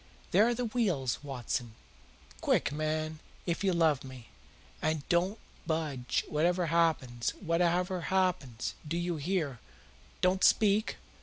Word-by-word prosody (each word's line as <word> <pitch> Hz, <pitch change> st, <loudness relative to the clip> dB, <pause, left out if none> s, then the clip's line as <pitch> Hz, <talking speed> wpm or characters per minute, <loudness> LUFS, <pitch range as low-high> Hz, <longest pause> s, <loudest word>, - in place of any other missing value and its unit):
"There 215 Hz, -, +5 dB
are 240 Hz, -, +1 dB
the 245 Hz, +1 st, -1 dB
wheels, 185 Hz, -, 0 dB
Watson. 120 Hz, -4 st, -3 dB, 0.7 s
Quick, -, -, +2 dB
man, 155 Hz, +1 st, -2 dB, 0.3 s
if 175 Hz, +2 st, -1 dB
you 195 Hz, -, +3 dB
love 160 Hz, -5 st, +3 dB
me! 130 Hz, -3 st, -11 dB, 0.5 s
And 155 Hz, -2 st, -1 dB
don't 180 Hz, +5 st, +2 dB, 0.3 s
budge, 150 Hz, -6 st, -1 dB
whatever 175 Hz, +4 st, +1 dB
happens 135 Hz, -8 st, +1 dB
whatever 180 Hz, +1 st, +1 dB
happens, 180 Hz, -11 st, 0 dB
do 165 Hz, +3 st, -1 dB
you 175 Hz, -1 st, -1 dB
hear? 150 Hz, -, -1 dB, 0.6 s
Don't 185 Hz, +1 st, +2 dB
speak! 215 Hz, 0 st, +4 dB
165 Hz, 125 wpm, -31 LUFS, 140-185 Hz, 0.7 s, There